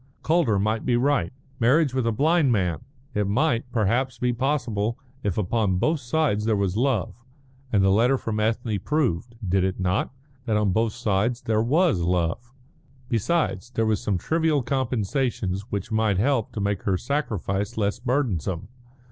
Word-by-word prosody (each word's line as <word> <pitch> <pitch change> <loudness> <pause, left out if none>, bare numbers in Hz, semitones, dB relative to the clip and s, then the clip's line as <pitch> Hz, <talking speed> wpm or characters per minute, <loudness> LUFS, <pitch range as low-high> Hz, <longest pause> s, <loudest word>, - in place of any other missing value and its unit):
Calder 155 -10 +2
might 110 +3 0
be 120 -2 +2
right. 125 -9 +1 0.3
Marriage 135 +4 +3
with 130 -3 0
a - - +2
blind 150 +4 +3
man! 90 -8 0 0.3
It 105 -1 0
might, 125 +2 0
perhaps, 120 +3 0
be 125 -1 0
possible 120 -4 -1 0.2
if 100 -6 -2
upon 105 -1 +1
both 155 - +1
sides 125 -5 0
there 110 -1 +2
was 100 -2 0
love, 120 -4 0 0.6
and 100 -3 +3
the 95 - +4
letter 120 +7 +3
from 110 -3 -3
Ethne 110 -1 0
proved 120 - -1
did 95 +1 +2
it 95 0 -1
not? 95 +5 0 0.3
that 110 -3 +1
on 105 -2 +2
both 110 +3 +1
sides 115 +1 0
there 110 -1 +1
was 150 - +2
love. 90 +7 -1 0.6
Besides, 120 - 0
there 115 -3 0
were 110 0 +2
some 100 -1 -1
trivial 160 - +1
compensations 120 -5 -1
which 100 +1 -4
might 110 -3 +2
help 120 +1 +1
to - - -4
make 100 -1 -1
her 95 -2 0
sacrifice 105 - -2
less 105 0 0
burdensome. 115 - -1
115 Hz, 165 wpm, -24 LUFS, 100-130 Hz, 0.6 s, the